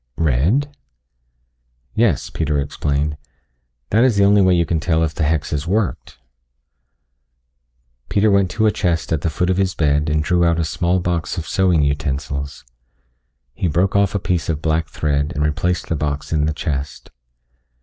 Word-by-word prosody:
"Red?" 85 - +1 1.2
"Yes," 110 - +1
Peter 75 -2 -1
explained, 70 +1 -1 0.7
"That 110 +4 +4
is 125 -5 +3
the 100 - +4
only 100 0 +5
way 95 -1 +4
you 85 -1 +2
can 80 0 -1
tell 80 0 +1
if 80 -1 -1
the 80 - -5
hex 75 0 0
has 75 +1 -2
worked." 105 +1 -2 1.9
Peter 105 +1 +3
went 100 -2 +3
to 110 +3 0
a 110 - +4
chest 85 -4 -1
at 75 - -1
the 85 - 0
foot 90 +3 0
of 90 - 0
his 95 -1 0
bed 75 0 +1
and 75 0 +1
drew 90 +2 +2
out 85 -1 +2
a 80 - 0
small 90 +3 0
box 85 0 -2
of 85 - -4
sewing 90 -5 +2
utensils. 70 -1 -3 0.9
He 90 - -1
broke 90 +5 +1
off 100 -1 +2
a - - +1
piece 85 -5 -1
of 80 -2 -1
black 80 0 0
thread 75 +1 -1
and 75 - 0
replaced 90 +4 -1
the 85 - -1
box 75 0 -3
in 75 -1 +1
the 80 - 0
chest. 70 -3 -4
80 Hz, 175 wpm, -19 LUFS, 75-95 Hz, 1.9 s, only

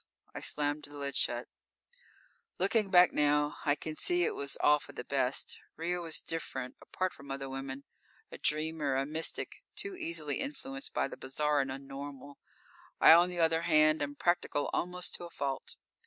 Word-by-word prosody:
I - - -5
slammed 145 0 +1
the 145 0 -9
lid 140 -1 -4
shut. 120 -1 0 1.1
Looking 215 -4 +2
back 180 -2 +7
now, 150 0 +2
I 145 - +5
can 155 +1 -6
see 355 - +1
it - - +1
was 140 -1 -2
all 150 0 +4
for - - -11
the - - -6
best. - - 0 0.2
Ria 175 +2 -2
was 165 -2 0
different 135 -6 -4
apart 185 0 -2
from 140 0 -13
other 135 0 -4
women. 135 +1 -5 0.5
A - - -9
dreamer, 155 -2 0
a 135 +1 +1
mystic, 155 +3 -2 0.2
too 400 -1 -4
easily 160 - -2
influenced 275 -1 -5
by - - 0
the - - -9
bizarre 145 +2 +1
and 135 -1 -3
un 135 +1 -7
normal. 140 0 -8 0.6
I, - - +10
on 175 +2 +6
the 175 -1 -3
other 165 0 +3
hand, 155 -2 +4
am 145 0 -2
practical 175 -3 0
almost 180 0 +1
to 175 - -7
a - - -9
fault. 140 -4 -3
150 Hz, 180 wpm, -32 LUFS, 140-170 Hz, 1.1 s, I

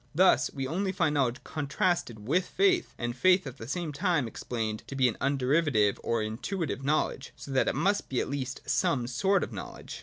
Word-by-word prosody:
Thus, 185 +3 +5
we 135 -2 -4
often 190 +8 -1
find 175 -5 +1
knowledge 130 -4 0
contrasted 140 - -1
with 180 +6 +2
faith, 375 -2 +2
and 120 0 -3
faith 185 +6 +4
at 135 -1 -7
the 115 - -7
same 165 +1 -3
time 165 -4 +1
explained 110 -2 -4
to 140 - -6
be 130 -2 +4
an 115 - 0
underiva 140 +3 +2
tive 105 -2 +3
or 115 -2 0
intuitive 135 - -3
knowledge: 140 -1 -1
— - - -35
so 140 - -9
that 135 - +2
it - - +1
must 195 +8 +1
be 130 - 0
at - - -1
least 135 -2 -4
some 125 -4 +1
sort 185 +11 +1
of - - -5
knowledge. 95 -9 -8
140 Hz, 210 wpm, -29 LUFS, 120-175 Hz, -, Thus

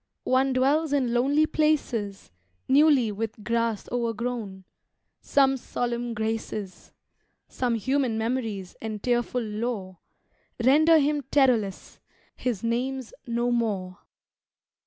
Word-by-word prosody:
One 265 +1 +2
dwells 280 +4 +2
in 255 -4 +1
lonely 280 +5 +3
places, 245 - -1 0.4
Newly 275 -4 +4
with 215 +1 -5
grass 230 -2 -1
o'ergrown; 230 -4 -3 0.6
some 270 -1 +3
solemn 240 -1 -3
graces, 220 -3 -4 0.6
Some 245 -2 -1
human 255 0 0
memories 220 -5 -3
and 215 -2 -5
tearful 240 0 0
lore, 210 -4 -4 0.6
Render 310 +6 +6
him 295 0 +2
terrorless: 240 -9 +1 0.4
his 235 -6 -3
name's 250 +2 -2
"No 240 +1 0
More." 200 -6 -1
240 Hz, 100 wpm, -26 LUFS, 220-265 Hz, 0.6 s, Render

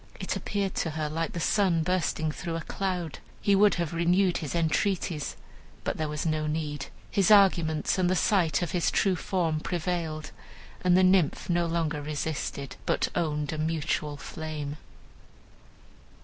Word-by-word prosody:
It - - -2
appeared 200 -2 -2
to 165 - 0
her 155 -1 -2
like 165 +2 -2
the 170 - -3
sun 175 -2 +2
bursting 160 -3 0
through 165 +2 -4
a 165 - -3
cloud. 180 -3 -3 0.2
He 200 - +2
would 205 +1 +5
have 170 -2 -2
renewed 175 +2 +3
his 155 +1 -4
entreaties, 170 -1 0 0.5
but - - -2
there 155 -1 -1
was 150 +1 -3
no 155 -1 0
need; 150 -2 -3 0.2
his 195 -3 +3
arguments 180 -6 +4
and 180 -1 +3
the 185 - +2
sight 175 -5 +2
of 175 - -3
his 180 -3 +1
true 195 -2 +2
form 170 -4 -1
prevailed, 165 -2 -3 0.5
and 180 0 +5
the 185 - +5
Nymph 185 -2 +3
no 175 0 +2
longer 165 -3 -1
resisted, 145 -2 -4
but - - +1
owned 150 -2 -1
a 155 - -4
mutual 155 -2 -1
flame. 150 -1 -5
165 Hz, 160 wpm, -28 LUFS, 155-180 Hz, 0.5 s, would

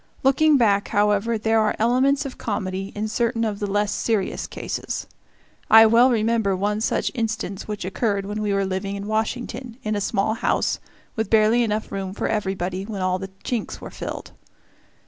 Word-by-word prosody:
Looking 290 +3 +5
back, 205 -5 +3
however, 210 +2 +2
there 225 +1 +2
are 215 - +2
elements 260 +5 +2
of 270 - -7
comedy 195 -2 -3
in 210 +1 -2
certain 230 +1 0
of 210 -2 -3
the 205 - -2
less 205 +1 +1
serious 215 -4 -1
cases. - - -4 0.6
I 225 0 +9
well 235 +3 +6
remember 225 -4 +1
one 205 +3 -1
such - - 0
instance 220 -5 -3
which 210 -3 -4
occurred 200 0 -1
when 210 +2 -4
we 210 -1 0
were 195 0 +1
living 190 +1 -3
in 200 0 -5
Washington, 230 +2 -3
in 215 0 -1
a 205 - -1
small 195 +2 0
house, 225 - 0 0.4
with 220 -3 -2
barely 220 +2 +4
enough 215 -2 -1
room 195 -1 -4
for - - -1
everybody 190 -3 -2
when 200 -2 -4
all 185 0 +1
the 195 0 -6
chinks 235 -4 -3
were - - -9
filled. - - -6
215 Hz, 180 wpm, -23 LUFS, 200-230 Hz, 0.6 s, I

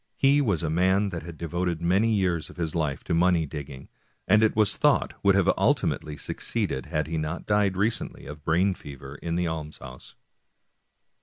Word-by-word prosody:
He 140 +1 +4
was 100 - 0
a 80 - 0
man 95 +4 +2
that 85 -3 -5
had 85 0 -9
devoted 85 +1 -2
many 95 +7 +2
years 90 -5 0
of - - -14
his 80 -3 -2
life 75 -3 -2
to - - -2
money 85 -1 +3
digging, 70 -2 -8 0.4
and 105 +4 +5
it 110 - +3
v^as 105 -3 +3
thought - - +2
would - - +4
have - - +4
ultimately 75 -1 0
succeeded 65 -1 -3
had 75 0 -1
he 80 0 -3
not 80 +3 -4
died 105 -2 +2
recently 110 +4 -1
of 75 - -8
a - - -25
brain 90 +6 +2
fever 70 -5 -10
in 85 0 -2
the 90 0 0
almshouse. 75 -5 -7
85 Hz, 185 wpm, -26 LUFS, 75-95 Hz, 0.4 s, and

